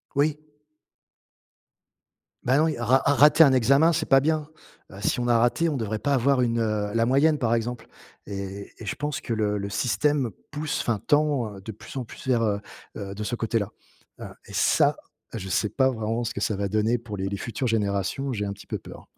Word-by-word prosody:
Oui. 150 Hz, +1 st, +2 dB, 2.1 s
Bah 130 Hz, +3 st, +3 dB
non, 155 Hz, -, +4 dB
il 155 Hz, -, 0 dB
y -, -, -8 dB
a 120 Hz, -, -4 dB
ra 130 Hz, +3 st, +5 dB
rater 145 Hz, +3 st, +7 dB
un 135 Hz, -, +5 dB
examen, 140 Hz, +7 st, +4 dB
c'est -, -, -1 dB
pas 135 Hz, -, +7 dB
bien. 155 Hz, 0 st, 0 dB, 0.4 s
Heu, 95 Hz, -, -10 dB
si 115 Hz, +4 st, 0 dB
on 120 Hz, -, -1 dB
a 120 Hz, -1 st, +4 dB
raté, 120 Hz, +8 st, +2 dB
on 145 Hz, -, -1 dB
devrait 110 Hz, -2 st, -3 dB
pas 140 Hz, +6 st, 0 dB
avoir 135 Hz, +1 st, +3 dB
une, 115 Hz, -1 st, +1 dB
heu, 105 Hz, -2 st, -1 dB
la 115 Hz, 0 st, +2 dB
moyenne, 145 Hz, +4 st, +3 dB
par 115 Hz, -3 st, +1 dB
exemple. 120 Hz, +1 st, -3 dB, 0.4 s
Et 100 Hz, 0 st, -6 dB
et 110 Hz, -, -9 dB
je 95 Hz, -, -3 dB
pense 150 Hz, +1 st, -3 dB
que 115 Hz, -, -5 dB
le 105 Hz, -2 st, 0 dB
le 100 Hz, 0 st, -4 dB
système 135 Hz, +3 st, +1 dB, 0.2 s
pousse 150 Hz, +1 st, -3 dB
enfin 115 Hz, -3 st, 0 dB
tend, 145 Hz, -8 st, +2 dB
heu, -, -, -10 dB
de 110 Hz, -, -8 dB
plus 110 Hz, -, -12 dB
en 130 Hz, -, -2 dB
plus 120 Hz, -, -12 dB
vers, 120 Hz, -3 st, +2 dB
heu 100 Hz, -2 st, 0 dB, 0.4 s
heu, 100 Hz, -1 st, -6 dB
de 105 Hz, -, -6 dB
ce 120 Hz, -, -2 dB
côté 115 Hz, 0 st, 0 dB
là. 100 Hz, -, -3 dB, 0.5 s
Heu -, -, -6 dB, 0.2 s
et -, -, -12 dB
ça, -, -, +3 dB, 0.4 s
je 95 Hz, -4 st, -5 dB
sais 105 Hz, +4 st, +1 dB
pas 130 Hz, +4 st, +2 dB
vraiment 115 Hz, 0 st, -2 dB
ce 115 Hz, -, -4 dB
que -, -, -4 dB
ça 105 Hz, -1 st, 0 dB
va 100 Hz, 0 st, -1 dB
donner 110 Hz, +4 st, +1 dB
pour 110 Hz, -3 st, -7 dB
les 95 Hz, +1 st, -2 dB
les 100 Hz, -, -3 dB
futures 115 Hz, +5 st, -3 dB
générations. 110 Hz, +5 st, -1 dB
J'ai 105 Hz, -3 st, -2 dB
un 100 Hz, -, -3 dB
petit 100 Hz, -, -12 dB
peu -, -, -3 dB
peur. -, -, -12 dB
115 Hz, 230 wpm, -25 LUFS, 105-140 Hz, 2.1 s, rater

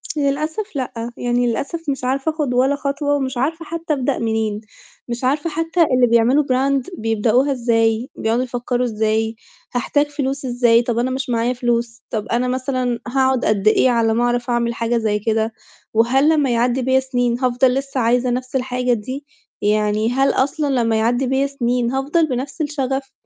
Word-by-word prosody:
للأسف 305 Hz, +7 st, -2 dB
لأ، 245 Hz, -3 st, -4 dB
يعني 245 Hz, 0 st, 0 dB
للأسف 280 Hz, +8 st, -2 dB
مش 270 Hz, -2 st, -2 dB
عارفة 270 Hz, +4 st, 0 dB
آخُد 300 Hz, -5 st, -2 dB
ولا 260 Hz, +3 st, +3 dB
خطوة 285 Hz, +1 st, -1 dB
ومش 265 Hz, -2 st, -2 dB
عارفة 320 Hz, +6 st, -1 dB
حتّى 330 Hz, 0 st, -3 dB
أبدأ 270 Hz, -1 st, -1 dB
منين، 220 Hz, -2 st, -1 dB, 0.5 s
مش 240 Hz, +1 st, -5 dB
عارفة 290 Hz, +5 st, +1 dB
حتّى 330 Hz, +2 st, -1 dB
اللي 250 Hz, -1 st, +4 dB
بيعملوا 235 Hz, +5 st, +4 dB
brand 270 Hz, 0 st, +1 dB
بيبدأوها 225 Hz, +5 st, +1 dB
إزاي، 230 Hz, -1 st, +1 dB
بيقعدوا 230 Hz, +3 st, 0 dB
يفكّروا 245 Hz, 0 st, -2 dB
إزاي، 220 Hz, 0 st, 0 dB, 0.4 s
هحتاج 290 Hz, +4 st, +1 dB
فلوس 275 Hz, -1 st, -3 dB
إزاي؟ 240 Hz, -2 st, +3 dB
طَب 240 Hz, -1 st, -2 dB
أنا 255 Hz, +2 st, 0 dB
مش 260 Hz, 0 st, -3 dB
معايا 235 Hz, +1 st, +1 dB
فلوس، 235 Hz, -1 st, -1 dB
طَب 215 Hz, -2 st, -3 dB
أنا 240 Hz, +2 st, 0 dB
مثلًا 255 Hz, -1 st, -1 dB
هاقعُد 260 Hz, 0 st, +1 dB
قد 215 Hz, -1 st, +1 dB
إيه 255 Hz, -, +5 dB
على 230 Hz, -2 st, +2 dB
أمّا 235 Hz, +2 st, +1 dB
أعرف 245 Hz, 0 st, 0 dB
أعمل 235 Hz, -1 st, +1 dB
حاجة 230 Hz, +1 st, -1 dB
زي 215 Hz, -2 st, 0 dB
كده؟ 220 Hz, +1 st, 0 dB, 0.4 s
وهل 255 Hz, +6 st, +3 dB
لمّا 300 Hz, -4 st, +2 dB
يعدّي 245 Hz, +2 st, +1 dB
بّيا 260 Hz, +1 st, +3 dB
سِنين 245 Hz, -2 st, -1 dB
هافضل 250 Hz, 0 st, +2 dB
لسّه 275 Hz, 0 st, -2 dB
عايزة 245 Hz, +1 st, +2 dB
نَفْس 250 Hz, +2 st, -3 dB
الحاجة 250 Hz, -1 st, 0 dB
دي؟ 255 Hz, +6 st, -5 dB, 0.4 s
يعني 210 Hz, +1 st, +1 dB
هل 270 Hz, +2 st, +2 dB
أصلًا 275 Hz, -1 st, 0 dB
لمّا 230 Hz, -1 st, +1 dB
يعدّي 245 Hz, +4 st, +1 dB
بيّا 265 Hz, +2 st, +1 dB
سِنين، 245 Hz, -3 st, -1 dB
هافضل 285 Hz, +5 st, +1 dB
بنَفْس 270 Hz, +3 st, -4 dB
الشَغَف، 270 Hz, -2 st, -2 dB
250 Hz, 175 wpm, -20 LUFS, 235-275 Hz, 0.5 s, إيه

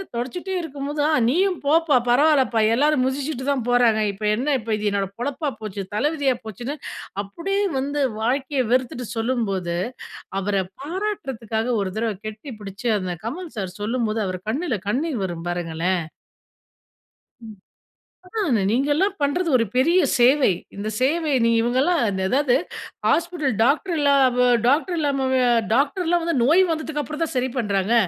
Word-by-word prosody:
தொடச்சிட்டே 345 Hz, +11 st, -3 dB
இருக்கும்போது, 290 Hz, -1 st, -4 dB
ஆ -, -, +2 dB, 0.2 s
நீயும் 365 Hz, +5 st, +1 dB
போப்பா 315 Hz, -2 st, +4 dB
பரவால்லப்பா. 265 Hz, -3 st, +4 dB
எல்லாரும் 290 Hz, 0 st, +3 dB
மிதிச்சுட்டு 265 Hz, 0 st, -2 dB
தான் 255 Hz, -4 st, -1 dB
போறாங்க. 240 Hz, -3 st, +4 dB
இப்ப 200 Hz, +2 st, -10 dB
என்ன! 250 Hz, +6 st, -3 dB
இப்ப 225 Hz, 0 st, -6 dB
இது 210 Hz, 0 st, 0 dB
என்னோட 195 Hz, -1 st, -1 dB
பெழப்பா 285 Hz, +4 st, -2 dB
போச்சு. 205 Hz, -2 st, -5 dB
தலை 285 Hz, +8 st, +2 dB
விதியா 275 Hz, -4 st, +1 dB
போச்சுன்னு 240 Hz, +7 st, -5 dB, 0.5 s
அப்படியே 380 Hz, -, -2 dB, 0.2 s
வந்து 285 Hz, +2 st, -2 dB, 0.2 s
வாழ்க்கைய 260 Hz, +3 st, 0 dB
வெறுத்துட்டு 250 Hz, -1 st, 0 dB
சொல்லும்போது, 205 Hz, -8 st, -1 dB, 0.6 s
அவர 200 Hz, +1 st, -2 dB, 0.3 s
பாராட்டுறதுக்காக 270 Hz, -, -3 dB
1 190 Hz, -, -2 dB
தரவை 220 Hz, -2 st, -1 dB
கட்டி 215 Hz, +6 st, -7 dB
பிடிச்சு 200 Hz, +3 st, -4 dB
அந்த 185 Hz, -1 st, -3 dB
கமல் 330 Hz, +8 st, -5 dB
சார் 185 Hz, -3 st, -4 dB
சொல்லும்போது. 225 Hz, 0 st, -1 dB
அவரு 185 Hz, -1 st, -4 dB
கண்ணுல 270 Hz, 0 st, -1 dB
கண்ணீர் 270 Hz, 0 st, -1 dB
வரும் 170 Hz, -2 st, -6 dB
பாருங்களேன். 175 Hz, +1 st, -1 dB, 1.4 s
ம். 215 Hz, -2 st, -10 dB, 0.7 s
ஆ -, -, -25 dB, 0.4 s
நீங்கள்லாம் 290 Hz, -, +1 dB
பண்றது 330 Hz, +5 st, +1 dB
ஒரு 230 Hz, -, +2 dB
பெரிய 335 Hz, +8 st, +4 dB, 0.2 s
சேவை. 260 Hz, +1 st, +5 dB, 0.3 s
இந்த 205 Hz, +2 st, -4 dB
சேவை 305 Hz, +4 st, +1 dB
நீ 230 Hz, -, +4 dB
இவங்கலாம் 260 Hz, +9 st, +2 dB
அதாவது 240 Hz, +8 st, +1 dB, 0.5 s
ஹாஸ்பிட்டல் 330 Hz, -7 st, +1 dB
டாக்டர் 315 Hz, -, +2 dB
இல்லா 285 Hz, -1 st, +4 dB, 0.2 s
வ 250 Hz, -, +2 dB, 0.3 s
டாக்டர் 320 Hz, +7 st, +2 dB
இல்லாம, 280 Hz, -3 st, 0 dB
வே 260 Hz, -, +3 dB, 0.3 s
டாக்டர்லாம் 330 Hz, +6 st, +1 dB
வந்து 335 Hz, 0 st, 0 dB
நோய் 330 Hz, +9 st, +5 dB
வந்ததுக்கு 315 Hz, -2 st, -2 dB
அப்புறம் 305 Hz, +4 st, -5 dB
தான் 315 Hz, -, -6 dB
சரி 255 Hz, +1 st, +1 dB
பண்றாங்க. 205 Hz, -2 st, +1 dB
260 Hz, 145 wpm, -23 LUFS, 220-300 Hz, 1.4 s, சேவை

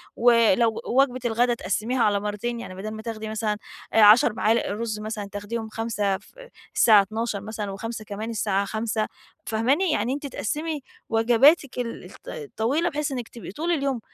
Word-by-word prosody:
و 245 Hz, +1 st, +5 dB, 0.2 s
لو 225 Hz, +2 st, +1 dB
وجبة 255 Hz, 0 st, +2 dB
الغداء 240 Hz, +1 st, +2 dB
تقسميها 230 Hz, +5 st, -1 dB
على 205 Hz, -1 st, +3 dB
مرتين، 210 Hz, +4 st, -3 dB
يعني 185 Hz, -5 st, -8 dB
بدل 205 Hz, +3 st, -5 dB
ما 220 Hz, 0 st, -7 dB
تاخدي 220 Hz, -1 st, -5 dB
مثلًا، 215 Hz, -1 st, -1 dB, 0.4 s
آآ، 225 Hz, -, +5 dB
10 210 Hz, +2 st, +7 dB
معالق 225 Hz, +1 st, +1 dB
رز 215 Hz, 0 st, -3 dB
مثلًا، 210 Hz, -1 st, -5 dB
تاخديهم 220 Hz, +2 st, -5 dB
5 210 Hz, -3 st, -1 dB
ف 200 Hz, -, -22 dB, 0.5 s
الساعة 215 Hz, -3 st, +7 dB
12:00 220 Hz, +1 st, -3 dB
مثلًا، 210 Hz, -1 st, -5 dB
و5 220 Hz, +3 st, -6 dB
كمان 210 Hz, +2 st, -5 dB
الساعة 200 Hz, -3 st, 0 dB
17:00 220 Hz, +1 st, -2 dB, 0.4 s
فاهماني؟ 265 Hz, +11 st, +1 dB
يعني 240 Hz, -2 st, 0 dB
أنتِ 285 Hz, +1 st, -4 dB
تقسمي 300 Hz, +5 st, -3 dB, 0.3 s
وجباتك 245 Hz, +5 st, +4 dB
ال 235 Hz, -2 st, -4 dB, 0.2 s
الط 440 Hz, -3 st, -7 dB
الطويلة 305 Hz, +9 st, +2 dB
بحيث 300 Hz, -2 st, -2 dB
إنِك 245 Hz, -3 st, -4 dB
تبقي 235 Hz, -, -9 dB
طول 325 Hz, -, -2 dB
اليوم 275 Hz, -6 st, 0 dB
225 Hz, 170 wpm, -25 LUFS, 210-245 Hz, 0.5 s, 10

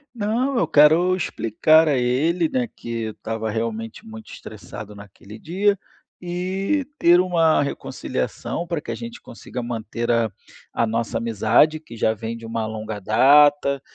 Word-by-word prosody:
Não, 235 Hz, +4 st, 0 dB
eu -, -, +1 dB
quero 160 Hz, +5 st, +5 dB
explicar 155 Hz, -, +2 dB
a 145 Hz, -, +2 dB
ele, 150 Hz, +8 st, +1 dB
né, 250 Hz, +3 st, -1 dB
que 120 Hz, -, -12 dB, 0.2 s
eu 110 Hz, -, -4 dB
estava 110 Hz, 0 st, -4 dB
realmente 115 Hz, -, -4 dB
muito 220 Hz, -1 st, -11 dB
estressado 105 Hz, 0 st, -10 dB
naquele 105 Hz, +1 st, -13 dB
dia 195 Hz, -, +1 dB, 0.5 s
e 190 Hz, +10 st, -2 dB
ter 175 Hz, +1 st, +6 dB
uma 165 Hz, -4 st, +3 dB
reconciliação 140 Hz, -, -4 dB
pra 170 Hz, -2 st, -2 dB
que -, -, -7 dB
a -, -, -3 dB
gente 235 Hz, 0 st, -8 dB
consiga 120 Hz, +1 st, -8 dB
manter 115 Hz, 0 st, -3 dB
a 115 Hz, -1 st, +2 dB, 0.4 s
a 115 Hz, -, 0 dB
nossa 115 Hz, +1 st, -2 dB
amizade, 115 Hz, +7 st, +2 dB
que 120 Hz, -7 st, -12 dB
já 110 Hz, 0 st, +2 dB
vem 115 Hz, +1 st, -6 dB
de 115 Hz, -, -11 dB
uma 115 Hz, 0 st, -3 dB
longa 110 Hz, -1 st, -5 dB
data. 140 Hz, +5 st, +4 dB
135 Hz, 155 wpm, -22 LUFS, 115-175 Hz, 0.5 s, ter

